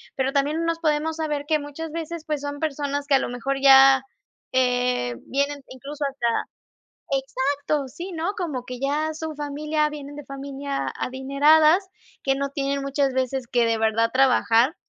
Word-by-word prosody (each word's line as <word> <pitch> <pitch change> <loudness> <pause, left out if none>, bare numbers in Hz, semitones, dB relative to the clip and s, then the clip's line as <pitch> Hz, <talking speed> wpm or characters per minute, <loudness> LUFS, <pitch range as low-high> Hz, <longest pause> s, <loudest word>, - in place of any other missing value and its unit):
pero 265 0 0
también 285 +2 +1
no 335 - -1
nos 335 0 -1
podemos 315 0 0
saber 300 -3 -2
que 310 0 +2
muchas 290 +2 -7
veces 330 0 -5
pues, 300 -3 -2
son 285 0 -5
personas 285 -2 -2
que 290 - +2
a - - +5
lo - - -3
mejor 270 +3 -2
ya, 270 -1 +8 0.5
eh, 250 - +1
vienen 280 +1 -1
incluso 285 +3 -6
hasta 270 -3 -2 0.8
¡exacto! 275 +1 -1
sí, 350 +9 -8
¿no? 340 +3 -2
Como 295 -9 -3
que 250 0 -7
ya 300 +4 0
su 315 0 -5
familia 300 +1 -1
vienen 290 -1 -8
de 295 -1 -9
familia 275 0 -4
adineradas, 300 +7 +3 0.4
que 270 - +2
no 280 +1 -2
tienen 280 0 -2
muchas 275 0 0
veces 260 -1 -1
que 240 0 +2
de 230 0 +1
verdad 225 +1 +2
trabajar 255 +1 +3
280 Hz, 170 wpm, -24 LUFS, 265-300 Hz, 0.8 s, ya